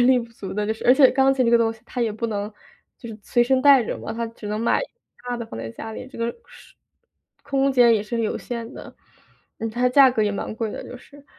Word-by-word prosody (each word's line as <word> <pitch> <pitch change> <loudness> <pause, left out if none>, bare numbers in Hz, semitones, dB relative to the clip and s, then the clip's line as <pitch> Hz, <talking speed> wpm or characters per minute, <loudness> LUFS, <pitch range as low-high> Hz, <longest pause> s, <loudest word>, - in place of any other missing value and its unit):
而 - - +4
力 255 -1 +5
不 230 -1 -7
足 195 - -7
的 210 0 -1
就 220 - -1
是， - - -11
而 250 - +8
且 265 -1 +6
钢 270 +1 +3
琴 255 - +1
这 - - +3
个 235 - +6
东 225 -1 +1
西 225 - -18
它 250 - -5
也 220 -2 0
不 230 +2 -3
能 205 0 -4 0.5
就 235 - -10
是 220 -1 -9
随 240 +4 +2
身 260 +1 +2
带 280 -4 +7
着 - - -4
嘛， - - -6
它 230 0 -3
只 225 -2 -11
能 210 +1 -2
买 230 - +2 0.5
大 245 - -2
的 235 - -5
放 115 - -9
在 115 - -6
家 220 - -8
里， 250 - -8
这 - - -13
个 230 0 -1 0.2
时 - - -17 0.7
空 275 -1 +1
间 245 -3 +5
也 215 - +1
是 230 +2 -3
有 220 - -2
限 235 0 -6
的。 - - -11 0.6
嗯， 225 - -3
它 240 +3 -4
的 250 - +3
价 270 0 +7
格 225 -3 0
也 210 - +1
蛮 210 - -5
贵 225 -1 -3
的 - - -6
就 250 - -9
是。 285 +2 -18
235 Hz, 300 characters per minute, -23 LUFS, 220-255 Hz, 0.7 s, 而